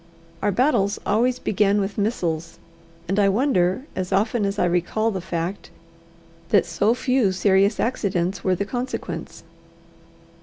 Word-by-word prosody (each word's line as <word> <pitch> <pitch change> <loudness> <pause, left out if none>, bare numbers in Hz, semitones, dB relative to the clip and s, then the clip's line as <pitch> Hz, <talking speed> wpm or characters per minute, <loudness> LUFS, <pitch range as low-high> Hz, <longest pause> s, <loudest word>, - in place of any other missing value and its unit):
Our 205 - +1
battles 205 -3 +2
always 240 +4 +2
began 205 -2 +1
with 195 0 -2
missiles; 170 -7 -2 0.5
and 195 +3 0
I 200 -1 +4
wonder, 210 -1 +1
as 185 0 -3
often 205 +2 +1
as 200 +1 -3
I 180 - +2
recall 180 +6 0
the 190 -3 -4
fact, 170 +2 -4 0.8
that 200 -4 +4
so 200 +7 +1
few 250 -5 +1
serious 195 +2 +2
accidents 195 -6 -1
were 185 -1 +2
the 200 +3 -2
consequence. 250 +4 -5
200 Hz, 140 wpm, -23 LUFS, 185-220 Hz, 0.8 s, I